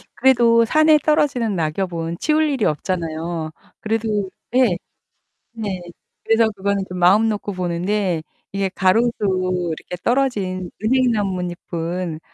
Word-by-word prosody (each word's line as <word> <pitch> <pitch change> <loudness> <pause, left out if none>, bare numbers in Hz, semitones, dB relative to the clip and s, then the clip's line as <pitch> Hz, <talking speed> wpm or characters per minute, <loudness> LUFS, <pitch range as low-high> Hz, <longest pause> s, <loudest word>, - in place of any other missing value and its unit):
그래도 235 -3 +5
산에 310 +4 +5
떨어지는 265 -8 +1
낙엽은 165 0 -2
치울 310 0 +2
일이 265 -6 -1
없잖아요. 165 0 -2 0.3
그래도 215 -3 -1 0.3
예. 245 -9 +4 0.8
네. 205 -5 -4 0.4
그래서 225 0 +3
그거는 200 0 -1
좀 180 - -6
마음 195 +6 +5
놓고 205 -1 -3
보는데 180 0 -1 0.3
이게 195 0 0
가로수 195 +6 +2 0.7
이렇게 180 - -8
떨어진 200 -9 0
은행나뭇잎은 180 -8 -1
200 Hz, 270 characters per minute, -21 LUFS, 175-230 Hz, 0.8 s, 그래도